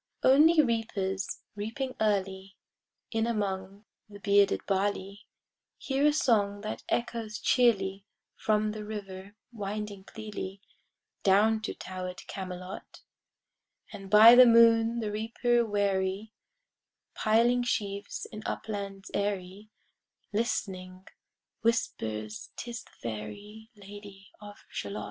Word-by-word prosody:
Only 305 +4 +6
reapers, 205 -5 -2
reaping 225 +6 -4
early 195 -2 -1 0.5
In 225 0 0
among 200 -2 -3 0.2
the 205 - -11
bearded 200 -1 +3
barley, 200 +1 -2 0.5
Hear 275 +2 +1
a - - +5
song 205 -8 +1
that 215 0 -5
echoes 230 -3 -2
cheerly 200 -6 +2 0.3
From 215 -1 +1
the 215 0 -6
river 200 -2 -8 0.2
winding 205 -2 -5
clearly, 205 -3 -7 0.6
Down 215 +3 +4
to 220 - -4
tower'd 185 0 -7
Camelot: 185 -1 -8 0.9
And 195 -2 -9
by 215 +3 +9
the 250 0 +9
moon 230 0 +5
the 210 -2 -2
reaper 235 +3 +1
weary 200 0 -1 0.8
Piling 235 +3 +3
sheaves 205 -4 -3
in 215 -2 -7
uplands 200 -2 -5
airy, 200 0 -3 0.6
Listening, 185 -4 -3 0.6
whispers 110 - -2
"'Tis 240 +1 -7
the - - -21
fairy 205 - -7
Lady 200 -1 -12
of 205 0 -12
Shalott." 100 +1 -5
205 Hz, 105 wpm, -29 LUFS, 195-225 Hz, 0.9 s, by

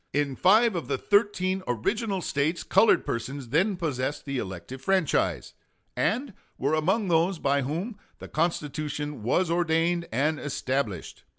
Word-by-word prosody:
In 140 -1 0
five 215 - +4
of 170 - -3
the 135 - 0
thirteen 190 - +1
original 195 - -1
States 150 +5 0
colored 195 +4 +4
persons 125 +2 -4
then 190 - +2
possessed 145 -4 -2
the 140 -2 -2
elective 95 +7 -7
franchise, 190 -1 +1 0.4
and 250 +1 0 0.2
were 140 +3 0
among 190 +7 +1
those 170 +2 +2
by 140 -1 +1
whom 175 - -4 0.2
the - - -9
Constitution 150 -3 -2
was 165 - +1
ordained 170 0 +1
and 150 +6 +1
established. 130 - -3
155 Hz, 135 wpm, -27 LUFS, 140-185 Hz, 0.4 s, five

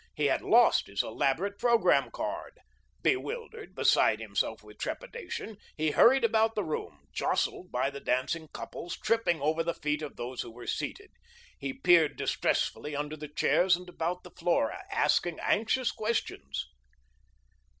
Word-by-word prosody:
He 150 - 0
had 140 - +2
lost 235 +2 +5
his 100 0 -1
elaborate 165 - -1
programme 235 -2 +4
card. - - -5 0.5
Bewildered, 450 +2 -2
beside - - +4
himself - - -2
with - - -15
trepidation, 465 - -5 0.2
he 155 0 +1
hurried 265 - +6
about 225 0 +3
the 210 - 0
room, 85 - -5
jostled 180 - -1
by 130 +3 0
the 140 - -7
dancing 140 +6 -1
couples, 175 +3 -7
tripping 220 -7 +1
over 155 +3 +1
the 170 0 -2
feet 150 0 -1
of 150 -2 -6
those 125 +1 -5
who 120 - -7
were 120 +1 -11
seated; 400 - -4 0.5
he - - -3
peered 175 - +4
distressfully 150 0 0
under 150 +1 -3
the 150 0 -7
chairs 180 +5 +3
and 180 +1 -10
about 175 +1 -3
the 180 - -12
floor, 170 -10 +1 0.2
asking 175 -2 +1
anxious 225 +4 +1
questions. 235 - -3
175 Hz, 150 wpm, -30 LUFS, 150-230 Hz, 0.5 s, hurried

